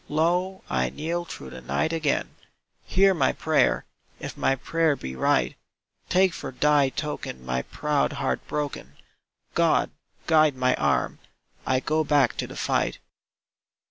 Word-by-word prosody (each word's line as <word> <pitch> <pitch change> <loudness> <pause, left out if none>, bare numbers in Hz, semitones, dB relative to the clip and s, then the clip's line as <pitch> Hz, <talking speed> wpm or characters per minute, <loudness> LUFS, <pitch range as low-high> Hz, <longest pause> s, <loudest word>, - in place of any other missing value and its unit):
Low 175 +5 0
I 65 -1 0
kneel 170 - -3
through 65 - -9
the 65 - -9
night 160 - -1
again, 155 -3 0 0.5
Hear 195 +1 +4
my 170 - +2
prayer, - - +2 0.3
if - - -6
my 135 - +2
prayer 160 +3 +1
be 65 - -7
right! 65 -1 +1 0.5
Take 185 -1 +4
for - - -6
Thy 145 +1 +3
token 135 - -5
my 65 0 -1
proud 150 - -1
heart 140 -1 -1
broken. 145 -2 -4 0.6
God, - - +2 0.3
guide 155 -3 +4
my 130 0 +2
arm! - - 0 0.5
I 130 0 +2
go 155 +2 +1
back 145 -4 +3
to - - -2
the - - -10
fight. - - 0
150 Hz, 140 wpm, -25 LUFS, 130-165 Hz, 0.6 s, Hear